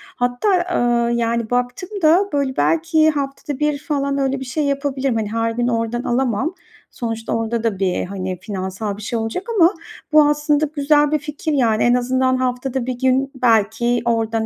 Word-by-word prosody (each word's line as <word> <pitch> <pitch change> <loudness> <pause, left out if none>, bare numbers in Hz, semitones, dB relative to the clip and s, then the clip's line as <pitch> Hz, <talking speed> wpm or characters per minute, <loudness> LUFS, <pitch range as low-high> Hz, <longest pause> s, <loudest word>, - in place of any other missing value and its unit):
Hatta, 305 +10 +1
ııı, 240 0 +2
yani, 235 -1 0
baktım 245 +8 -2
da 345 +6 +4
böyle 275 -2 -1
belki 320 -1 +3
haftada 280 -1 -4
1 300 -1 +1
falan 280 -2 -2
öyle 270 -1 0
bir 265 - -6
şey 295 +5 -2
yapabilirim, 275 -3 -1
hani, 215 -1 -2
her 230 0 0
gün 240 +1 -1
oradan 230 0 -1
alamam. 260 - 0 0.4
Sonuçta 225 -1 -4
orada 225 0 -1
da 220 -5 -1
bir, 185 -2 0
hani, 185 -1 -5
finansal 195 +1 -4
bir - - -9
şey 225 +2 -2
olacak 225 - -3
ama 345 +1 +5 0.4
bu 305 0 +7
aslında 295 0 +2
güzel 295 0 +3
bir 305 - +2
fikir, 300 +1 -4
yani. 230 -6 +2
En 240 - +4
azından 255 +1 +1
haftada 255 0 -2
1 250 -1 -4
gün 265 +1 +1
belki 235 0 +2
oradan, 225 -1 0
250 Hz, 175 wpm, -20 LUFS, 230-285 Hz, 0.4 s, bu